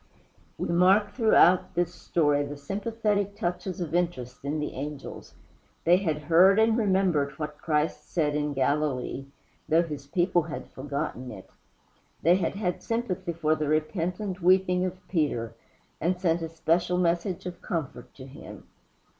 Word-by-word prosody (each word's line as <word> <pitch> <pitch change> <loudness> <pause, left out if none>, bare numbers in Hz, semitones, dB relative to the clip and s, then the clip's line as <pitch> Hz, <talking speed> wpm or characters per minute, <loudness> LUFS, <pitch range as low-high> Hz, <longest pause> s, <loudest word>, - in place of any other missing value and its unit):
We - - -3
mark 190 +4 +4
throughout 185 -8 +4
this 175 0 0
story 145 -3 +1
the 145 0 -6
sympathetic 205 +4 -1
touches 180 -2 -3
of 165 -3 -4
interest 135 -9 -2
in 145 +2 -2
the 150 - -3
angels. 145 +1 -7 0.5
They 175 +2 +5
had 160 -6 -2
heard 175 +6 +6
and 220 0 +4
remembered 190 -10 +1
what 150 -1 -6
Christ 150 -1 -1
said 150 -4 +1
in 150 0 -1
Galilee, 135 -1 -1 0.4
though 165 +2 +4
his 150 -4 -7
people 175 +2 +2
had 155 -1 -7
forgotten 130 -2 -4
it. 95 -5 -11 0.7
They 175 +3 +5
had 185 0 -1
had 185 -3 -2
sympathy 230 -7 -2
for 155 -1 +1
the 155 -1 -1
repentant 180 +5 -1
weeping 180 0 +3
of 185 0 -6
Peter, 140 - -1 0.5
and 180 +3 0
sent 170 -2 +1
a 165 - -4
special 170 +2 +1
message 175 +1 0
of 180 -1 -7
comfort 150 -8 -4
to 130 - -10
him. 135 +1 -11
170 Hz, 150 wpm, -27 LUFS, 150-185 Hz, 0.7 s, heard